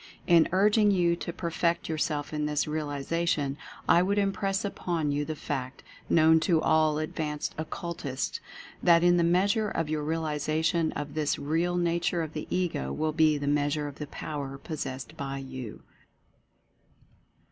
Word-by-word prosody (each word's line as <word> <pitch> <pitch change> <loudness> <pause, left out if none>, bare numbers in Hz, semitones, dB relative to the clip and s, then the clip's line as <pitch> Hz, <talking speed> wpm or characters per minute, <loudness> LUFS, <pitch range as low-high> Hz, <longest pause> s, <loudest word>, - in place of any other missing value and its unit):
In 170 -2 +5
urging 210 +3 +4
you 175 -3 +3
to 170 - -4
perfect 170 0 -1
yourself 155 -2 -2
in 150 0 -1
this 150 -1 0
realization 150 -1 -1 0.3
I 170 - +6
would 200 +3 +1
impress 195 0 0
upon 170 -6 -2
you 145 +1 -1
the 155 - -4
fact, 130 -3 -5 0.3
known 160 0 +6
to 165 0 +2
all 155 -1 +3
ad 155 - -4
vanced 150 -2 -2
Occultists, 155 -4 -4 0.4
that 170 -1 +5
in 175 0 +5
the 170 - +3
measure 200 +5 +2
of 165 -4 -2
your 155 -1 -1
realiza 155 0 -1
tion 165 -2 +2
of 145 0 -5
this 150 -1 0
Real 165 +4 0
Nature 170 0 +1
of 155 -1 -6
the 155 - -5
Ego 170 - -1
will 155 - -1
be 155 -1 +4
the 145 - -4
measure 145 +1 +1
of 145 - -9
the 150 - -5
Power 140 -2 -5
possessed 140 -1 -6
by 135 0 -4
You. 130 -4 -7
155 Hz, 160 wpm, -28 LUFS, 145-170 Hz, 0.4 s, I